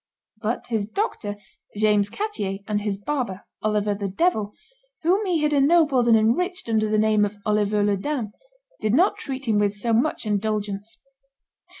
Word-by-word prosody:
But 225 Hz, +3 st, -2 dB
his 220 Hz, -3 st, -1 dB
doctor, 215 Hz, -, -3 dB, 0.4 s
James 210 Hz, -1 st, +3 dB
Coettier, 205 Hz, -, -3 dB
and 210 Hz, -1 st, 0 dB
his 205 Hz, -1 st, -2 dB
barber, 205 Hz, -4 st, -3 dB, 0.2 s
Oliver 210 Hz, -1 st, +1 dB
the 200 Hz, 0 st, -3 dB
Devil, 210 Hz, -, 0 dB, 0.5 s
whom 370 Hz, +6 st, +3 dB
he 335 Hz, -4 st, +1 dB
had 300 Hz, 0 st, +2 dB
ennobled 285 Hz, -3 st, +4 dB
and 230 Hz, -1 st, +6 dB
enriched 360 Hz, -, 0 dB
under 215 Hz, -1 st, +1 dB
the 215 Hz, -, +2 dB
name 215 Hz, -1 st, +3 dB
of 205 Hz, 0 st, -2 dB
Oliver 210 Hz, 0 st, +2 dB
le 205 Hz, -1 st, +2 dB
Daim, 240 Hz, -1 st, -3 dB, 0.5 s
did 215 Hz, +2 st, +1 dB
not 360 Hz, +7 st, +3 dB
treat 270 Hz, -1 st, -5 dB
him 215 Hz, -2 st, +3 dB
with 205 Hz, -1 st, +1 dB
so 230 Hz, +3 st, 0 dB
much 240 Hz, +3 st, +1 dB
indulgence. 210 Hz, 0 st, -2 dB
215 Hz, 165 wpm, -24 LUFS, 205-275 Hz, 0.5 s, and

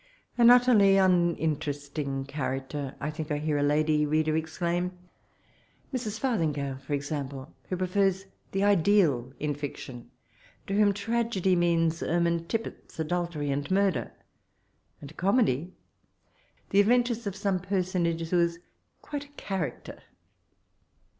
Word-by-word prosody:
* -, -, -40 dB
An 235 Hz, 0 st, +8 dB
utterly 240 Hz, -6 st, +6 dB
uninteresiing 150 Hz, -6 st, 0 dB
character 135 Hz, 0 st, -4 dB
P -, -, -7 dB
I 150 Hz, -, -1 dB
think 155 Hz, 0 st, -6 dB
I 150 Hz, -, 0 dB
hear 150 Hz, 0 st, -1 dB
a -, -, +1 dB
lady 150 Hz, +1 st, +2 dB
reader 155 Hz, +1 st, +1 dB
exclaim— 170 Hz, +3 st, -2 dB, 1.0 s
Mrs 220 Hz, -4 st, -3 dB
Farthincrale^ 150 Hz, -, -1 dB
for 140 Hz, +2 st, -5 dB
example, 140 Hz, -1 st, -5 dB, 0.2 s
who 185 Hz, -, -1 dB
prefers 190 Hz, +1 st, +1 dB, 0.3 s
the 195 Hz, +1 st, 0 dB
ideal 175 Hz, -, +3 dB
in 150 Hz, 0 st, -1 dB
fiction; 135 Hz, -4 st, -7 dB, 0.6 s
to 195 Hz, -, -4 dB
whom 205 Hz, 0 st, +4 dB
tragedy 205 Hz, -2 st, 0 dB
means 170 Hz, -1 st, +2 dB
ermine 170 Hz, 0 st, 0 dB
tippets, 225 Hz, +4 st, -5 dB
adultery, 160 Hz, -3 st, -2 dB
and 145 Hz, +1 st, -2 dB
murder; 195 Hz, 0 st, +1 dB, 0.9 s
and 145 Hz, +2 st, -10 dB
comedy, 185 Hz, -, +1 dB, 1.0 s
the 200 Hz, -, +4 dB
adventures 235 Hz, +1 st, +2 dB
of 195 Hz, -, -3 dB
some 195 Hz, -2 st, 0 dB
person 185 Hz, -1 st, 0 dB
age 165 Hz, 0 st, -2 dB
who 180 Hz, -, +2 dB
is 170 Hz, 0 st, +1 dB, 0.5 s
quite 290 Hz, -1 st, -5 dB
a -, -, -18 dB
* 285 Hz, -, -28 dB
character.' 190 Hz, -6 st, -4 dB
170 Hz, 135 wpm, -28 LUFS, 150-195 Hz, 1.0 s, An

